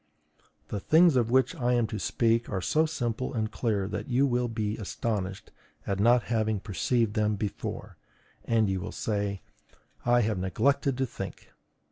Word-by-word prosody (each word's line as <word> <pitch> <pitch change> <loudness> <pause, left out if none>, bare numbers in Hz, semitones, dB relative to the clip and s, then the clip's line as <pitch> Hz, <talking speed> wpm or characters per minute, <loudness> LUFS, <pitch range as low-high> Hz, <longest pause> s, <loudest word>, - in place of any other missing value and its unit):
The 105 - -3
things 160 - +5
of 120 -3 +2
which 130 +7 +3
I 125 -7 0
am 120 -2 +3
to 110 -1 -4
speak 115 0 +1
are 95 - -1
so 155 - +2
simple 125 -3 -3
and 110 -1 -1
clear 105 -5 -1
that - - -4
you 130 +1 +3
will 125 -2 +1
be 110 -2 -2
astonished 100 -2 -3 0.3
at 100 -1 -2
not 120 +3 +4
having 110 -2 0
perceived 110 +2 0
them 105 0 +1
before, 100 0 -5 0.5
and 115 -2 +2
you 95 -1 -1
will - - -5
say: 100 -2 -2 0.6
"I 120 0 +4
have 105 -4 0
neglected 135 +9 +1
to 130 - +1
think." - - -8
115 Hz, 165 wpm, -28 LUFS, 105-125 Hz, 0.6 s, things